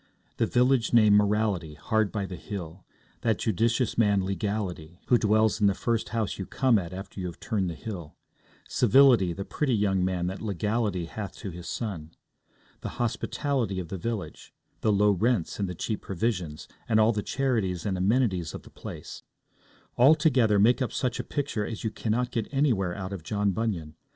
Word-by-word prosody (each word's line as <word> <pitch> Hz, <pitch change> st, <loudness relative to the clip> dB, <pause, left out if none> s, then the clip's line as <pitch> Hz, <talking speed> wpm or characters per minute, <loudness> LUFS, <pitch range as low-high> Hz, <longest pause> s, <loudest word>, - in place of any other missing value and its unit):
The -, -, +2 dB
village 125 Hz, -1 st, +2 dB
named 110 Hz, -3 st, +6 dB
Morality, 105 Hz, -6 st, +1 dB
hard 110 Hz, +7 st, 0 dB
by 100 Hz, -3 st, -2 dB
the 95 Hz, -, -6 dB
hill; 90 Hz, -2 st, -7 dB, 0.4 s
that 115 Hz, -2 st, +1 dB
judicious 115 Hz, +3 st, 0 dB
man 100 Hz, -4 st, +3 dB
Legality, 95 Hz, -4 st, -3 dB
who 120 Hz, -, +5 dB
dwells 110 Hz, 0 st, +2 dB
in 100 Hz, -, +5 dB
the 100 Hz, -, +2 dB
first 115 Hz, +1 st, -1 dB
house 110 Hz, -4 st, -2 dB
you 95 Hz, -, -4 dB
come 125 Hz, -5 st, +3 dB
at 85 Hz, -3 st, -6 dB
after 95 Hz, +2 st, -8 dB
you 90 Hz, -, -3 dB
have 85 Hz, -, -8 dB
turned 100 Hz, -6 st, -1 dB
the 85 Hz, -, -5 dB
hill; 85 Hz, -4 st, -7 dB, 0.5 s
Civility, 125 Hz, -5 st, +5 dB
the 100 Hz, +3 st, -5 dB
pretty 135 Hz, -5 st, 0 dB
young 95 Hz, -3 st, +1 dB
man 90 Hz, -1 st, 0 dB
that 95 Hz, +2 st, -4 dB
Legality 105 Hz, -2 st, -1 dB
hath 100 Hz, +4 st, -6 dB
to 100 Hz, -, -6 dB
his 85 Hz, 0 st, -8 dB
son; 85 Hz, -9 st, -5 dB, 0.6 s
the -, -, -7 dB
hospitality 120 Hz, -3 st, -1 dB
of 85 Hz, -3 st, -6 dB
the 95 Hz, -, -4 dB
village; 115 Hz, -1 st, -5 dB, 0.2 s
the 110 Hz, -, +2 dB
low 105 Hz, +1 st, +4 dB
rents 105 Hz, -1 st, 0 dB
and 100 Hz, -2 st, -1 dB
the 90 Hz, -, -5 dB
cheap 105 Hz, +5 st, -3 dB
provisions, 90 Hz, -6 st, -3 dB, 0.2 s
and 110 Hz, -1 st, +4 dB
all 110 Hz, +1 st, +5 dB
the 105 Hz, -2 st, -1 dB
charities 110 Hz, -10 st, -1 dB
and 95 Hz, -, 0 dB
amenities 95 Hz, -4 st, +1 dB
of -, -, -8 dB
the -, -, -15 dB
place, -, -, -9 dB, 0.8 s
all 135 Hz, +6 st, +7 dB
together 125 Hz, -9 st, +3 dB
make 115 Hz, +5 st, +4 dB
up 130 Hz, -, 0 dB
such 125 Hz, -, -1 dB
a -, -, -1 dB
picture 140 Hz, -7 st, -2 dB
as 110 Hz, +2 st, -5 dB
you 110 Hz, -, -1 dB
cannot 120 Hz, +3 st, -1 dB
get 115 Hz, -4 st, -2 dB
anywhere 115 Hz, -11 st, +1 dB
out 95 Hz, 0 st, -5 dB
of 95 Hz, -, -5 dB
John 100 Hz, +4 st, 0 dB
Bunyan. 90 Hz, -7 st, -2 dB
105 Hz, 185 wpm, -27 LUFS, 95-115 Hz, 0.8 s, all